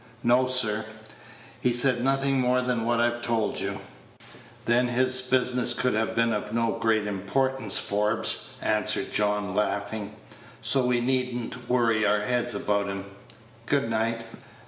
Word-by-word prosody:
"No, 125 +2 +3
sir. 110 -4 +1 0.8
He 125 - +1
said 120 0 +2
nothin' 135 +1 +1
more 125 0 +2
than 125 -2 -1
what 120 0 +1
I've 120 0 0
told 115 -3 -1
you." 100 0 -4 0.8
"Then 120 +1 +2
his 130 +1 +1
business 125 -1 +1
could 125 - 0
have 110 +1 -1
been 115 0 +2
of 105 0 -4
no 115 0 0
great 110 -2 +1
importance, 105 +4 0
Forbes," 105 +2 +1
answered 105 -2 0
John, 105 -2 0
laughing. 100 +1 -2 0.4
"So 125 +3 +3
we 125 -1 +1
need 125 0 0
n't 125 +1 -7
worry 115 -3 +2
our 105 0 +2
heads 120 +2 0
about 100 -1 0
him. 100 0 -5 0.6
Good 140 -5 0
night." 115 +1 -1
115 Hz, 145 wpm, -26 LUFS, 105-125 Hz, 0.8 s, No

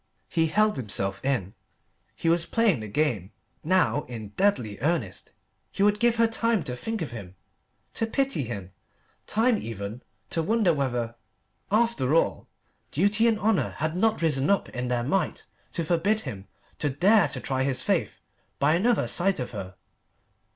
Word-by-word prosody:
He 165 -2 +2
held 215 +2 +2
himself 100 -5 -2
in; 125 -9 -1 0.6
he - - -3
was 170 0 +2
playing 230 - +2
the 110 - -6
game 105 - -1 0.3
now 180 -3 +2
in 115 -4 -7
deadly 125 - 0
earnest. 140 - -1 0.4
He 195 - 0
would 210 0 +3
give 235 0 +3
her 230 0 +4
time 225 -2 +1
to 125 - -4
think 220 - -3
of 150 - -6
him, 100 -6 -9 0.6
to 225 - -1
pity 270 - 0
him 100 -5 -6 0.6
time 225 +1 +3
even 110 +1 -6 0.3
to 165 - +2
wonder 210 0 +2
whether, 120 -5 -1 0.6
after 210 - +2
all, 165 - +1 0.4
duty 205 +8 +2
and 225 -2 +3
honour 215 -2 +1
had 155 +2 -1
not 215 -1 +1
risen 145 -3 +2
up 200 - +2
in 125 0 -4
their 120 -1 0
might 165 +10 -1 0.3
to 170 - -2
forbid 185 +7 +1
him 100 -8 -7 0.3
to 145 - 0
dare 195 +9 +4
to - - -5
try 130 -2 -1
his 130 -1 0
faith - - 0 0.4
by 145 +2 +3
another 220 +7 +2
sight 190 0 +1
of 125 - -4
her. 95 -4 -7
155 Hz, 165 wpm, -26 LUFS, -, 0.6 s, her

